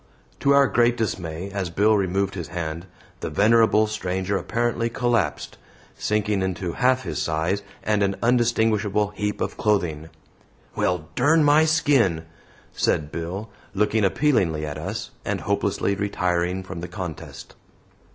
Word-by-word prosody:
To 140 - +2
our 140 0 +6
great 120 -2 +2
dismay, 95 -4 -3
as 95 -3 -2
Bill 105 +5 +3
removed 95 0 0
his 85 -5 -5
hand, 85 0 -5 0.3
the - - -4
venerable 110 +5 +4
stranger 95 -2 -2
apparently 115 +3 -1
collapsed 115 - -1 0.4
sinking 105 -1 0
into 95 -1 -2
half 130 +7 +2
his - - -3
size 80 +5 -1 0.2
and 105 -1 +1
an 100 -1 +1
undistinguishable 110 -4 +2
heap 105 0 -3
of - - -2
clothing. 85 -7 0 0.7
"Well, 90 -4 -1
dern 160 +2 +4
my 150 +2 +5
skin," 135 - +2 0.5
said 75 0 0
Bill, 95 +6 -5 0.2
looking 105 +2 +2
appealingly 95 - +1
at 75 0 -5
us, 75 - -5
and - - -2
hopelessly 100 - 0
retiring 90 -2 -1
from 95 -2 -7
the 90 - -5
contest. 90 -3 -8
100 Hz, 135 wpm, -23 LUFS, 90-115 Hz, 0.7 s, our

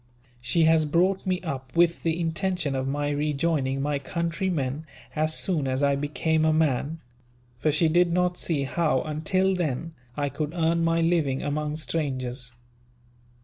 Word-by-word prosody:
"She 120 +7 +2
has 160 -1 +4
brought 185 +6 +1
me 185 -1 +1
up 135 -6 -6
with 170 0 +3
the 165 0 0
intention 170 -2 -1
of 135 0 -2
my 145 +1 -1
rejoining 145 -2 0
my 145 -1 0
countrymen, 165 -2 -2 0.3
as 155 0 0
soon 160 -8 0
as 130 +2 0
I 140 0 +3
became 155 +2 0
a 160 - +4
man; 155 0 0 0.6
for 155 - +2
she 155 +3 +3
did 175 +2 +3
not 180 0 +1
see 155 -5 0
how, 140 -1 +1
until 185 +5 +1
then, 165 -2 -2 0.2
I 145 -1 0
could 150 +3 -4
earn 165 0 +2
my 165 0 +2
living 165 -6 +1
among 150 +1 -2
strangers. 130 -6 -2
155 Hz, 155 wpm, -26 LUFS, 140-170 Hz, 0.6 s, has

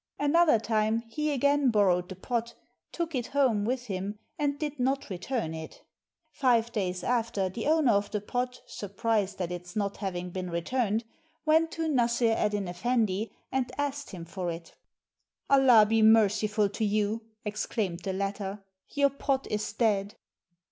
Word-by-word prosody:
Another 300 -1 +4
time, 220 0 0
he 300 +5 -1
again 285 0 +3
borrowed 185 -5 +2
the 190 - -6
pot, 235 +4 -3 0.4
took 335 -1 -3
it 245 -3 -2
home 255 -8 +2
with 250 +2 -1
him 200 0 -4 0.2
and 285 -1 0
did 295 -1 -4
not 270 -1 0
return 185 -1 -3
it. 160 0 -8 0.5
Five 235 -5 +2
days 185 -5 -2
after, 230 -6 0
the 220 +7 -4
owner 310 -5 +4
of 205 -1 +1
the 210 - -2
pot, 245 +4 -3
surprised 205 0 -2
at 180 -2 -2
its 175 0 -7
not 200 -2 -1
having 180 -3 -4
been 185 0 -4
returned, 215 +6 0 0.4
went 320 +1 +4
to 330 - -2
Nassr 240 -6 +2
Eddyn 210 -3 0
Effendi 215 +2 0 0.2
and 260 -2 -1
asked 285 0 -2
him 175 -4 -8
for 180 +1 -4
it. 165 0 -7 0.8
"Allah 255 -6 +7
be 225 +1 +3
merciful 215 -1 +4
to 210 - -3
you!" 210 +1 +1 0.2
exclaimed 210 -3 -2
the 190 +2 -3
latter, 195 +1 -3 0.3
"your 280 -1 +2
pot 275 0 -1
is 210 -1 -1
dead." 210 -3 0
220 Hz, 155 wpm, -29 LUFS, 195-255 Hz, 0.8 s, Allah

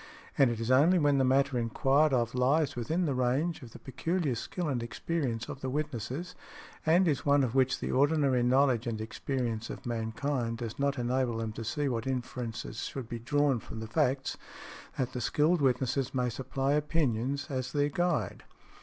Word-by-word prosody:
And 135 -3 +5
it 115 -2 -3
is 115 +2 -1
only 155 +8 +5
when 145 -4 +3
the - - +4
matter 135 0 +2
inquired 135 +6 +2
of 120 -3 +1
lies 135 +4 +2
within 160 +9 -1
the 145 - 0
range 130 +7 0
of 120 -3 -11
the - - -10
peculiar 160 +2 -2
skill 170 +8 -4
and 130 -5 -1
experience 120 0 -2
of 135 - -7
the 130 - -2
witnesses, 145 +3 -3 0.5
and 175 +3 +5
is 145 -4 +1
one 145 -2 +4
of 120 -3 -1
which 130 -1 +2
the - - -3
ordinary 140 -2 +3
knowledge 125 -1 +3
and 110 -2 -2
experience 115 0 -3
of - - -8
mankind 115 +1 -2
does 115 +1 -6
not 140 0 +1
enable 125 -1 0
them 115 -1 -3
to 115 - -6
see 145 +6 -1
what 115 -2 -2
inference 125 -3 -3 0.2
should 130 -4 -5
be 120 - -4
drawn 140 +1 +1
from 110 - -9
the 110 - -5
facts, 130 +5 0 0.6
that 130 -1 -1
the 125 - -3
skilled 150 +8 +2
witnesses 130 0 +1
may 125 -1 +1
supply 135 +3 -1
opinions 140 -3 0
as 130 -1 -2
their 145 0 +1
guide. 160 - -1
130 Hz, 185 wpm, -30 LUFS, 120-145 Hz, 0.6 s, And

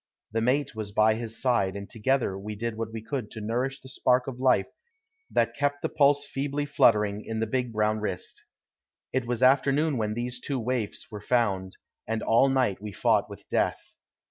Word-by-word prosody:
The 115 +1 0
mate 135 +4 +1
was 110 -2 -5
by 110 +1 +4
his 115 0 -4
side, 115 -7 +1
and 100 0 -6
together 120 -2 0
we 105 +2 -6
did 115 +1 -3
what 110 0 -4
we 110 -1 -6
could 125 -3 -4
to 110 - -7
nourish 125 +5 -2
the - - -14
spark 125 -1 +2
of 130 -2 -6
life 125 -7 +3 0.6
that - - +1
kept 145 0 -1
the - - 0
pulse 145 -1 +3
feebly 140 +1 -2
fluttering 105 -6 +3
in 110 0 -4
the 115 - +1
big 125 +1 -1
brown 110 0 +1
wrist. 95 -4 -4 0.7
It 130 -2 0
was 120 0 -1
afternoon 140 +3 +4
when 105 -1 -1
these 120 +1 -3
two 135 0 -2
waifs 120 -3 -2
were 105 -1 -7
found, 100 -6 0 0.3
and 115 0 -2
all 120 +4 +4
night 130 -8 +1
we 105 0 -6
fought - - +2
with - - -11
death. - - -1
115 Hz, 195 wpm, -27 LUFS, 105-130 Hz, 0.7 s, by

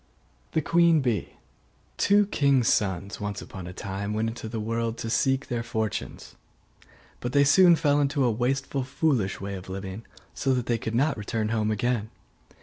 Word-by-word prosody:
THE 160 - +1
QUEEN 170 -1 +4
BEE 120 -5 -2 0.6
Two 205 +1 +4
kings' 140 - +2
sons 100 -1 -1
once 105 0 -3
upon 95 -2 -8
a - - -6
time 100 +3 -4
went 110 +1 0
into 115 -1 -7
the 115 0 -4
world 115 +1 -2
to 115 - -4
seek 135 +3 +1
their 120 -1 -2
fortunes; 110 -3 -4 0.9
but 120 0 -4
they 140 - +5
soon 175 +5 +6
fell 145 -2 +2
into 140 0 +1
a 120 - +3
wasteful 135 +4 -1
foolish 130 -7 0
way 100 +1 -5
of 95 -1 -8
living, 95 +2 -6 0.3
so 135 -1 0
that 125 -2 -1
they 120 -1 0
could 110 0 -4
not 140 +3 +2
return 110 +1 -2
home 110 -1 0
again. 110 0 -1
115 Hz, 175 wpm, -26 LUFS, 105-140 Hz, 0.9 s, soon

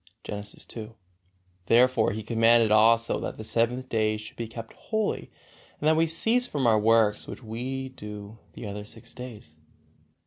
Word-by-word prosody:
Genesis 105 0 -7
ii. 110 -1 -7 0.7
Therefore 120 -2 +4
He 110 +2 -5
commanded 115 0 +4
also 115 +2 +4
that - - -5
the 110 - -7
seventh 120 +3 0
day 110 -2 +1
should 105 0 -10
be 115 - -4
kept 115 0 -9
holy 220 -2 -2 0.5
and 150 - 0
that 155 - +5
we 165 +1 +3
cease 230 +10 +3
from 140 - -2
our 110 -2 +5
works 110 -1 +3
which - - -8
we 130 +4 -4
do 105 -3 -9
the - - -8
other 105 0 -5
six 110 +1 -11
days. 110 -11 -10
115 Hz, 165 wpm, -27 LUFS, 110-130 Hz, 0.7 s, that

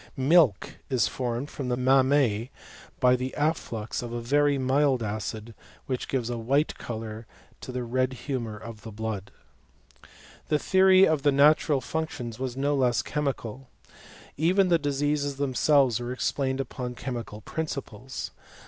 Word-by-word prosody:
Milk 135 - +3
is 125 -5 +2
formed 125 +2 -3
in 135 - -2
the 125 - 0
mammse 130 -3 +3 0.5
by 125 -1 +5
the 130 +1 -4
afflux 145 -8 -1
of 120 -1 -6
a 120 - -3
very 145 +4 +2
mild 135 -1 +2
acid, 110 +1 -4 0.3
which 130 -2 -3
gives 125 -4 -1
a 120 - -3
white 140 +7 +1
colour 110 -1 -6 0.3
to - - -7
the 125 0 -3
red 130 +2 0
humour 120 -5 -4
of 110 0 -10
the 110 - -9
blood. 105 -2 -4 1.2
The 150 - +2
theory 190 +3 +5
of 155 -3 +1
the 145 - +4
natural 145 0 +4
functions 130 -8 -4
was 130 -1 -4
no 140 +2 +1
less 125 -4 +2
chemical. 135 -4 -3 0.7
Even 180 +5 +3
the 170 -1 +4
diseases 145 0 0
themselves 135 -2 +3
were 120 0 -4
ex 130 - 0
plained 135 -1 -1
upon 125 -2 -4
chemical 120 -5 -6
principles. 135 -5 -5
130 Hz, 150 wpm, -27 LUFS, 115-145 Hz, 1.2 s, by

